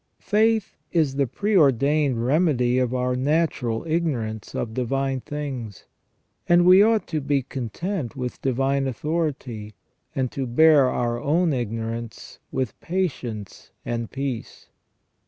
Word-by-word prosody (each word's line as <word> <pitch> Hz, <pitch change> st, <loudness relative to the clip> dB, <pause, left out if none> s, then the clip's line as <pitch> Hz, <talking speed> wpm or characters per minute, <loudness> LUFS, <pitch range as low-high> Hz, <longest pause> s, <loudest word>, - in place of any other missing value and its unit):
Faith 220 Hz, 0 st, +1 dB
is 155 Hz, -6 st, +2 dB
the 140 Hz, -2 st, +2 dB
preordained 140 Hz, -, +2 dB
remedy 130 Hz, -4 st, +2 dB
for 125 Hz, 0 st, -2 dB
our 125 Hz, 0 st, 0 dB
natural 130 Hz, -4 st, 0 dB
ignorance 135 Hz, -10 st, -2 dB
of 110 Hz, -, -3 dB
divine 135 Hz, +2 st, -1 dB
things, 130 Hz, -9 st, -6 dB, 0.6 s
and 175 Hz, 0 st, +6 dB
we 185 Hz, +2 st, +8 dB
ought 220 Hz, 0 st, +3 dB
to 155 Hz, -2 st, -2 dB
be 140 Hz, -1 st, 0 dB
content 135 Hz, -, -4 dB
with 125 Hz, -2 st, -5 dB
divine 135 Hz, +1 st, +1 dB
authority, 130 Hz, -, -3 dB, 0.4 s
and 130 Hz, -2 st, -1 dB
to 135 Hz, -2 st, -3 dB
bear 145 Hz, +1 st, +5 dB
our 120 Hz, -1 st, -1 dB
own 160 Hz, +2 st, +2 dB
ignorance 115 Hz, -1 st, -5 dB
with 130 Hz, -4 st, -3 dB
patience 130 Hz, -, -4 dB, 0.2 s
and 115 Hz, -1 st, -3 dB
peace. 135 Hz, -4 st, -5 dB
135 Hz, 120 wpm, -24 LUFS, 120-160 Hz, 0.6 s, we